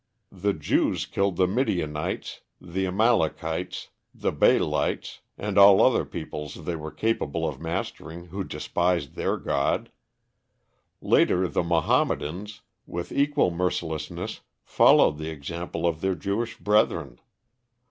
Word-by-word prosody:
The 100 Hz, +2 st, 0 dB
Jews 75 Hz, -4 st, 0 dB
killed 100 Hz, -2 st, 0 dB
the 95 Hz, -, +3 dB
Midianites, 90 Hz, -, -2 dB, 0.2 s
the 95 Hz, +2 st, -3 dB
Amalakites, 90 Hz, -4 st, 0 dB, 0.3 s
the -, -, -1 dB
Baalites, -, -, +1 dB, 0.2 s
and 100 Hz, -1 st, 0 dB
all 100 Hz, -1 st, +8 dB
other -, -, +4 dB
peoples 75 Hz, +1 st, -7 dB
they 85 Hz, -, -2 dB
were 80 Hz, -1 st, -6 dB
capable 85 Hz, -7 st, -1 dB
of 75 Hz, -2 st, -6 dB
mastering 85 Hz, +1 st, -5 dB
who 95 Hz, +3 st, -4 dB
despised 85 Hz, -6 st, -1 dB
their -, -, -1 dB
god. 70 Hz, 0 st, -1 dB, 1.1 s
Later, 90 Hz, +1 st, +3 dB
the 75 Hz, -, 0 dB
Mahommedans 105 Hz, +7 st, 0 dB, 0.3 s
with 85 Hz, 0 st, -5 dB
equal 140 Hz, -8 st, +2 dB
mercilessness 80 Hz, -3 st, -3 dB, 0.2 s
followed 75 Hz, -, +5 dB
the 80 Hz, 0 st, -4 dB
example 85 Hz, +4 st, -5 dB
of 85 Hz, -2 st, 0 dB
their 95 Hz, -1 st, 0 dB
Jewish 100 Hz, +8 st, -3 dB
brethren. 105 Hz, -, +1 dB
85 Hz, 115 wpm, -26 LUFS, 80-100 Hz, 1.1 s, all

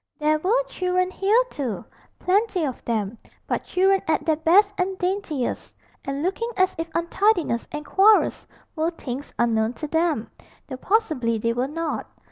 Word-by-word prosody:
There 305 Hz, 0 st, +2 dB
were 445 Hz, +10 st, +2 dB
children 365 Hz, -5 st, -1 dB
here 405 Hz, +5 st, +3 dB
too 255 Hz, -8 st, -4 dB, 0.3 s
plenty 380 Hz, -2 st, +1 dB
of 260 Hz, -4 st, -5 dB
them 220 Hz, -1 st, -2 dB, 0.3 s
but -, -, -2 dB
children 385 Hz, +1 st, +3 dB
at 315 Hz, -, +1 dB
their 315 Hz, -, +3 dB
best 370 Hz, +7 st, +4 dB
and 375 Hz, 0 st, -1 dB
daintiest, 360 Hz, -8 st, -2 dB, 0.3 s
and 275 Hz, +2 st, -3 dB
looking 400 Hz, +6 st, -1 dB
as 370 Hz, -1 st, +3 dB
if 330 Hz, 0 st, -3 dB
untidiness 340 Hz, -, +1 dB
and 300 Hz, 0 st, -5 dB
quarrels 415 Hz, +6 st, +4 dB, 0.3 s
were 320 Hz, +1 st, +1 dB
things 280 Hz, -4 st, -7 dB
unknown 225 Hz, -1 st, +1 dB
to 305 Hz, -, -6 dB
them 320 Hz, -7 st, 0 dB, 0.3 s
though 260 Hz, -, -7 dB
possibly 300 Hz, -, +1 dB
they 230 Hz, +2 st, 0 dB
were 245 Hz, +2 st, -1 dB
not. 325 Hz, +2 st, -3 dB
330 Hz, 155 wpm, -24 LUFS, 270-380 Hz, 0.3 s, best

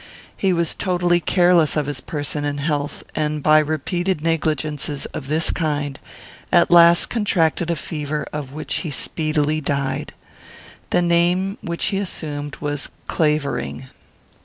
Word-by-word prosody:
He 195 Hz, -, +1 dB
was 170 Hz, -2 st, +1 dB
totally 175 Hz, -2 st, +1 dB
careless 175 Hz, -3 st, +3 dB
of 150 Hz, -, +1 dB
his 140 Hz, -3 st, -4 dB
person 145 Hz, -1 st, -4 dB
and 145 Hz, 0 st, -2 dB
health, 145 Hz, -1 st, -2 dB
and, 150 Hz, -1 st, -1 dB
by 155 Hz, 0 st, +6 dB
repeated 155 Hz, +3 st, -1 dB
negligences 155 Hz, -3 st, -1 dB
of 135 Hz, -, -6 dB
this 155 Hz, +3 st, +1 dB
kind, 145 Hz, -4 st, -2 dB, 0.5 s
at -, -, +4 dB
last 170 Hz, 0 st, +7 dB
contracted 175 Hz, -7 st, +1 dB
a 170 Hz, -, +1 dB
fever 150 Hz, -2 st, -4 dB
of 145 Hz, -3 st, -5 dB
which 155 Hz, +2 st, -3 dB
he 165 Hz, -, -3 dB
speedily 155 Hz, +1 st, 0 dB
died. 140 Hz, -1 st, -2 dB, 0.8 s
The 175 Hz, -, +2 dB
name 175 Hz, +3 st, +2 dB
which 170 Hz, 0 st, -2 dB
he 195 Hz, -, +1 dB
assumed 145 Hz, -6 st, -4 dB
was 145 Hz, -1 st, -3 dB, 0.2 s
Clavering. 150 Hz, -4 st, -1 dB
155 Hz, 135 wpm, -21 LUFS, 145-170 Hz, 0.8 s, last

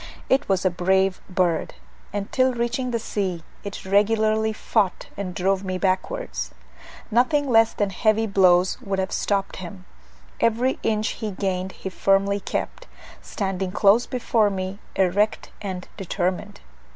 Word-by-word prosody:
It 270 Hz, -1 st, +2 dB
was 190 Hz, -1 st, +1 dB
a 185 Hz, -, +4 dB
brave 190 Hz, +2 st, +1 dB
bird; 180 Hz, -3 st, 0 dB, 0.4 s
and 200 Hz, 0 st, -4 dB
till 255 Hz, -1 st, +2 dB
reaching 240 Hz, +2 st, -1 dB
the 235 Hz, -, 0 dB
sea, 190 Hz, -6 st, -3 dB, 0.2 s
it 200 Hz, -1 st, -7 dB
regularly 215 Hz, +2 st, +2 dB
fought 215 Hz, -3 st, 0 dB
and 185 Hz, -3 st, -5 dB
drove 195 Hz, +1 st, +1 dB
me 185 Hz, -1 st, -2 dB
backwards. 200 Hz, -, -1 dB, 0.6 s
Nothing 255 Hz, +5 st, +3 dB
less 225 Hz, -2 st, +4 dB
than 205 Hz, -2 st, -1 dB
heavy 215 Hz, +3 st, +2 dB
blows 185 Hz, -3 st, +3 dB
would 195 Hz, -1 st, -2 dB
have 190 Hz, 0 st, -1 dB
stopped 200 Hz, -1 st, -1 dB
him; 185 Hz, 0 st, -9 dB, 0.5 s
every 235 Hz, +3 st, +2 dB
inch 215 Hz, -1 st, 0 dB
he 215 Hz, -, -4 dB
gained 190 Hz, -1 st, -2 dB
he 190 Hz, -, -6 dB
firmly 195 Hz, +1 st, +2 dB
kept, -, -, -4 dB, 0.3 s
standing 190 Hz, -2 st, -3 dB
close 205 Hz, +4 st, +4 dB
before 230 Hz, -4 st, +2 dB
me 190 Hz, 0 st, -4 dB, 0.2 s
erect 195 Hz, +3 st, +1 dB
and 185 Hz, -3 st, -5 dB
determined. 185 Hz, -, -2 dB
200 Hz, 140 wpm, -24 LUFS, 190-220 Hz, 0.6 s, a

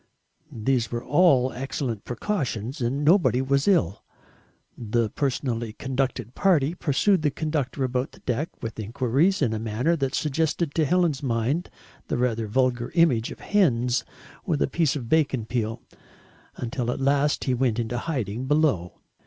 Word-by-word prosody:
These 120 Hz, -1 st, 0 dB
were 120 Hz, 0 st, -3 dB
all 135 Hz, -4 st, +4 dB
excellent 125 Hz, -4 st, -4 dB
precautions, 130 Hz, -, -3 dB
and, 135 Hz, +5 st, -1 dB
nobody 165 Hz, -6 st, +4 dB
was 140 Hz, +3 st, +1 dB
ill. 110 Hz, -, +2 dB, 0.7 s
The 115 Hz, -1 st, -1 dB
personally 120 Hz, -5 st, -2 dB
conducted 130 Hz, -2 st, -2 dB
party 165 Hz, -6 st, +2 dB
pursued 175 Hz, +4 st, +2 dB
the 150 Hz, -, +2 dB
conductor 145 Hz, -2 st, -2 dB
about 125 Hz, +1 st, -1 dB
the -, -, -16 dB
deck 135 Hz, +6 st, -2 dB
with 115 Hz, 0 st, -5 dB
enquiries 130 Hz, -, +1 dB
in 115 Hz, -4 st, +1 dB
a 110 Hz, -, -2 dB
manner 115 Hz, +9 st, 0 dB
that 135 Hz, -3 st, -1 dB
suggested 155 Hz, +1 st, 0 dB
to 160 Hz, -, +2 dB
Helen's 170 Hz, -3 st, +1 dB
mind 130 Hz, +6 st, -1 dB, 0.4 s
the -, -, -1 dB
rather 115 Hz, -3 st, 0 dB
vulgar 120 Hz, +1 st, +1 dB
image 135 Hz, -10 st, +3 dB
of -, -, -10 dB
hens 125 Hz, -, +2 dB, 0.4 s
with 160 Hz, -7 st, 0 dB
a -, -, +1 dB
piece 155 Hz, 0 st, +1 dB
of 125 Hz, -5 st, -5 dB
bacon 135 Hz, -5 st, +1 dB
peel, 115 Hz, -1 st, -3 dB, 0.7 s
until 120 Hz, 0 st, -3 dB
at 125 Hz, -, -2 dB
last 140 Hz, +2 st, +2 dB
he 130 Hz, -, 0 dB
went 125 Hz, -3 st, +1 dB
into 120 Hz, +1 st, -2 dB
hiding 125 Hz, -, -3 dB
below. 140 Hz, -, +1 dB
130 Hz, 155 wpm, -25 LUFS, 120-150 Hz, 0.7 s, all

